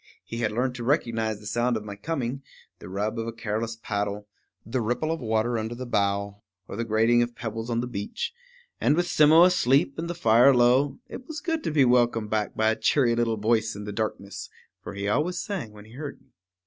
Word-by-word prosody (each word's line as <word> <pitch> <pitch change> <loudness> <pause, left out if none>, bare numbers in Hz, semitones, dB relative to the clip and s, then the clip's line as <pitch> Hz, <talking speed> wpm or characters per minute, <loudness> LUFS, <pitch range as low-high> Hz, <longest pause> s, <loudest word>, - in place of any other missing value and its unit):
He 115 - -6
had 110 -3 0
learned 125 +3 0
to 125 -1 -6
recognize 115 -5 0
the 105 - -14
sounds 120 +3 0
of 105 - -6
my 100 -1 -6
coming, 135 +2 -3 0.4
the - - -10
rub 105 +4 -2
of 115 - -3
a - - -2
careless 115 0 -3
paddle, 105 0 -3 0.4
the 120 +4 -1
ripple 120 +8 -1
of 165 - -2
water 110 +1 0
under 110 +2 -4
the 130 +1 -6
bow, 100 -2 -1 0.3
or - - -7
the 115 - -2
grating 115 +2 +3
of 120 0 -2
pebbles 115 0 -5
on 115 0 0
the 125 - -3
beach; 100 - -4 0.5
and 145 - +3
with 175 +1 +1
Simmo 160 -1 +6
asleep, 140 -5 +3
and 170 +1 -3
the 175 - -3
fire 125 -1 +5
low, 125 +3 +3
it 255 - -9
was 315 -1 -5
good 325 -3 -2
to - - +1
be 145 -3 +4
welcomed 120 -3 +2
back 110 -1 -1
by 110 0 +3
a - - 0
cheery 125 -2 +2
little 115 -1 0
voice 110 0 +1
in 105 - -7
the 105 0 -6
darkness; 100 -2 -4 0.3
for - - -8
he 100 0 -3
always 155 - 0
sang 185 - -4
when 105 0 -13
he 110 - -16
heard 140 +3 -7
me. 135 - -30
115 Hz, 225 wpm, -26 LUFS, 110-135 Hz, 0.5 s, Simmo